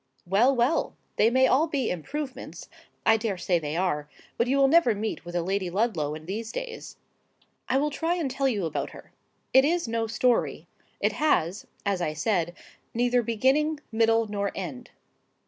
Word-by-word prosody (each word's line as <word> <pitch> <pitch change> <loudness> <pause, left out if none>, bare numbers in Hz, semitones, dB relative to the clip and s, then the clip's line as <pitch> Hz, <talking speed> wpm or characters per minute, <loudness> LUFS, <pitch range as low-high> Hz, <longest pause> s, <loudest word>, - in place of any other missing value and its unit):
Well, 220 +9 +3
well! 245 +6 +1 0.2
they 220 - +5
may 260 +2 +4
all 280 +5 +3
be 275 -6 -1
improvements,—I 255 - -3
dare 215 -3 -2
say 175 0 +1
they 150 0 -3
are; 150 -5 -1 0.3
but 235 - +1
you 270 +2 +2
will 275 0 +5
never 275 -6 +4
meet 215 +2 -3
with 175 0 -8
a 175 - +1
Lady 190 0 -1
Ludlow 175 -7 0
in 155 0 -10
these 220 +5 -4
days. - - -6 0.7
I 265 - +3
will 295 +2 +1
try 330 +4 0
and 315 -7 -2
tell 270 +1 0
you 210 -8 0
about 160 - -2
her. - - -15 0.4
It 265 - +7
is 335 0 +1
no 225 0 -1
story: 235 +2 +1 0.3
it - - +2
has, 200 - 0 0.2
as 200 -3 0
I 155 -3 -1
said, 175 0 0 0.4
neither 245 +1 +3
beginning, 265 +7 +1
middle, 225 0 +3
nor 200 -1 -2
end. 160 -10 -6
225 Hz, 175 wpm, -27 LUFS, 185-265 Hz, 0.7 s, It